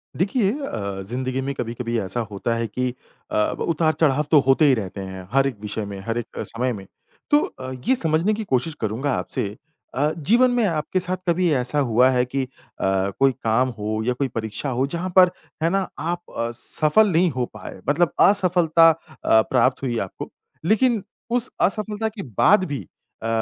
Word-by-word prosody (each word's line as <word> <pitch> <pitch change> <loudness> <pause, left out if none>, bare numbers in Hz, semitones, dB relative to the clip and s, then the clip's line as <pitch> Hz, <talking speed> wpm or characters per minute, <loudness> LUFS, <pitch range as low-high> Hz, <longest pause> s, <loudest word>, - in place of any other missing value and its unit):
देखिए 200 +3 +1
अ, 100 - -4
ज़िंदगी 130 +5 -3
में 140 +1 -3
कभी-कभी 120 0 -3
ऐसा 95 +3 -2
होता 105 +4 -2
है 115 0 -2
कि 125 +4 -2 0.4
अ, - - -2 0.2
उतार-चढ़ाव 155 -3 +1
तो 150 - +7
होते 135 +4 +5
ही 140 - +5
रहते 100 -4 -3
हैं 95 -1 -8
हर 135 0 +4
एक 130 -5 -4
विषय 105 0 -4
में, 100 -1 -7
हर 115 +4 -3
एक 120 - -2
समय 125 +2 -2
में। 100 -3 -8 0.5
तो 295 - +6
अ, 130 0 -7 0.2
ये 260 - +4
समझने 165 0 +1
की 220 +1 -3
कोशिश 155 - -1
करूँगा 115 +6 -1
आपसे, - - -2 0.5
अ, 145 +4 +1
जीवन 235 - +3
में 245 -2 +2
आपके 165 0 -1
साथ 185 0 +1
कभी 175 +1 +2
ऐसा 130 +2 +1
हुआ 125 -1 +4
है 125 -1 +2
कि 135 +2 -2
अ, - - -6 0.3
कोई 95 +7 +2
काम 115 +4 +2
हो 110 +1 -2
या 125 - +1
कोई 135 +2 -1
परीक्षा 110 +2 -4
हो 130 +1 0
जहाँ 170 +5 -3
पर 180 -1 +7 0.3
है 165 - +3
ना 195 0 0
आप 170 +3 -2 0.2
अ, 115 0 -1
सफल 155 - +3
नहीं 175 +2 +3
हो 125 -2 -1
पाए, 105 -2 -9
मतलब 165 +3 +2 0.2
असफलता 175 -4 +5
अ, 110 -7 +1
प्राप्त 130 0 +2
हुई 125 -3 -1
है 115 - -1
आपको? 95 - -7 0.3
लेकिन 220 +2 +2 0.3
उस 245 0 +1
असफलता 215 +2 0
के 215 -1 -8 0.2
बाद 205 -1 +5
भी 105 - -5 0.4
अ, - - -2
135 Hz, 190 wpm, -22 LUFS, 115-175 Hz, 0.5 s, तो